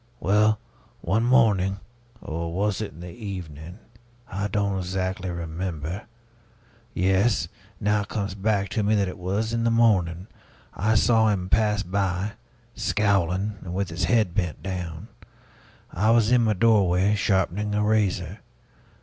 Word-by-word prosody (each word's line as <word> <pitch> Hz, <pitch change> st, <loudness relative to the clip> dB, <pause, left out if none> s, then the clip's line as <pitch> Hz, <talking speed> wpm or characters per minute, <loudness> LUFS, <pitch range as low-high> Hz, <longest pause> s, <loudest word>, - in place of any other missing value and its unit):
Well, 105 Hz, +2 st, +3 dB, 0.4 s
one 100 Hz, +6 st, +1 dB
morning 105 Hz, -6 st, +3 dB, 0.4 s
or 85 Hz, +1 st, -4 dB
was 100 Hz, +3 st, -1 dB
it 105 Hz, -, -4 dB
in 80 Hz, -, -13 dB
the 90 Hz, -1 st, -8 dB
evening? 90 Hz, -5 st, -7 dB, 0.5 s
I 100 Hz, +3 st, -3 dB
don't 100 Hz, -1 st, -1 dB
exactly 95 Hz, 0 st, -3 dB
remember 85 Hz, +2 st, -5 dB, 0.9 s
yes, 95 Hz, +1 st, +2 dB, 0.3 s
now 105 Hz, 0 st, +1 dB
it 100 Hz, -, -6 dB
comes 100 Hz, -2 st, -3 dB
back 100 Hz, -1 st, 0 dB
to 110 Hz, -, -1 dB
me 105 Hz, +1 st, +2 dB
that 100 Hz, -2 st, +1 dB
it 90 Hz, -, -7 dB
was 100 Hz, +5 st, -2 dB
in 115 Hz, 0 st, 0 dB
the 115 Hz, -, +3 dB
morning 95 Hz, -7 st, +2 dB, 0.5 s
I 110 Hz, +3 st, +1 dB
saw 110 Hz, 0 st, +4 dB
him 95 Hz, -4 st, 0 dB
pass 105 Hz, -1 st, +2 dB
by, 95 Hz, +1 st, -1 dB, 0.4 s
scowling 100 Hz, -1 st, 0 dB
and 90 Hz, -1 st, -6 dB
with 100 Hz, -1 st, -1 dB
his 85 Hz, +1 st, -1 dB
head 105 Hz, -1 st, +2 dB
bent 90 Hz, -4 st, -2 dB
down; 90 Hz, -1 st, -5 dB, 0.8 s
I 105 Hz, +6 st, +1 dB
was 115 Hz, -1 st, +4 dB
in 120 Hz, -2 st, +4 dB
my 110 Hz, -, +3 dB
doorway, 100 Hz, -2 st, +3 dB
sharpening 105 Hz, +1 st, 0 dB
a 105 Hz, -, +1 dB
razor. 105 Hz, -3 st, 0 dB
100 Hz, 145 wpm, -25 LUFS, 90-105 Hz, 0.9 s, saw